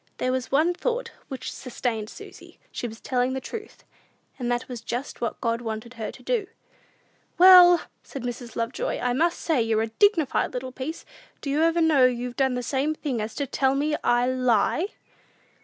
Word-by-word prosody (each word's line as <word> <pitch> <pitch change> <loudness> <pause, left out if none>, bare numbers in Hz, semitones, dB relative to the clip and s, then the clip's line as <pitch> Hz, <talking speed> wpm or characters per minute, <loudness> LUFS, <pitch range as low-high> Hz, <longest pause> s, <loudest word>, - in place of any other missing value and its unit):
There 255 - 0
was 255 0 -2
one 315 +6 +3
thought 475 +5 -2 0.2
which 265 -2 -6
sustained 235 -4 -3
Susy; - - -13
she 240 - -4
was 225 0 -10
telling 255 0 0
the 265 - -2
truth, 430 - -9 0.6
and 245 -1 -1
that 240 +1 -1
was 245 -3 -7
just 245 +4 -5
what 235 - -2
God 230 0 0
wanted 225 +1 -5
her 225 -3 -5
to - - -15
do. 460 -6 0 0.9
"Well," 360 -1 +9 0.2
said 270 - -8
Mrs. 245 -1 -6
Lovejoy, 230 +2 -2
"I 245 0 0
must 335 +6 +1
say 310 -7 +1
you're 225 -1 +1
a 225 - -3
dignified 320 - +2
little 255 +1 -4
piece! 265 +6 -6 0.4
Do 280 - -3
you 320 +3 +3
know 310 -6 +5
you've 245 0 -3
done 265 -2 +1
the 250 - -3
same 280 +5 0
thing 265 -8 -3
as 215 +1 -5
to 285 - -1
tell 270 0 +1
me 300 +2 +1
I 240 0 +3
lie?" 255 - +2
255 Hz, 185 wpm, -25 LUFS, 240-310 Hz, 0.9 s, Well